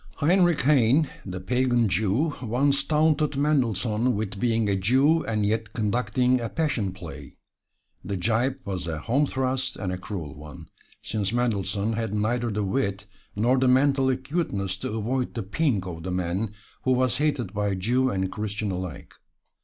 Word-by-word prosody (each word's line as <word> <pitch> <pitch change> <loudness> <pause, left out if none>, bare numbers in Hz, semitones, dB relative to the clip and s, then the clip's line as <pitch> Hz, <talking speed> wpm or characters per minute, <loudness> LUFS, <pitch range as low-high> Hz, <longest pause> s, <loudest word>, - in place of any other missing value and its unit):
Heinrich 175 +1 +3
Heine, 140 +2 +4 0.2
the 90 0 -4
pagan 120 +3 +2
Jew, 110 - +1
once 130 +4 +1
taunted 155 -1 +2
Mendelssohn 125 -5 +1
with 100 -2 -3
being 115 -2 +1
a 100 - +2
Jew 135 - +3
and 105 -2 0
yet 110 +1 -1
conducting 120 +3 +1
a 115 - -3
"Passion 130 - -1
Play." 80 -7 -10 0.7
The 100 -1 -3
gibe 115 +7 +1
was 95 -3 -4
a 80 -2 -2
home 140 - +1
thrust 130 0 -1
and 90 -2 -3
a 90 - -4
cruel 90 -7 -6
one, 75 +2 -11 0.3
since 105 -2 -2
Mendelssohn 105 -3 0
had 110 -2 -2
neither 115 +3 0
the 105 -1 -1
wit 100 -2 -1 0.3
nor 120 +5 +3
the 130 - +3
mental 135 +1 +4
acuteness 130 - -1
to - - -4
avoid 120 +4 -2
the 115 - -2
pink 105 - 0
of 85 -3 -6
the 95 - -5
man 90 +4 -2 0.3
who 130 - +2
was 130 -1 +1
hated 145 -6 0
by 100 -1 0
Jew 125 +8 +1
and 95 -4 -1
Christian 105 -1 -3
alike. 90 -5 -6
115 Hz, 160 wpm, -26 LUFS, 100-130 Hz, 0.7 s, Heine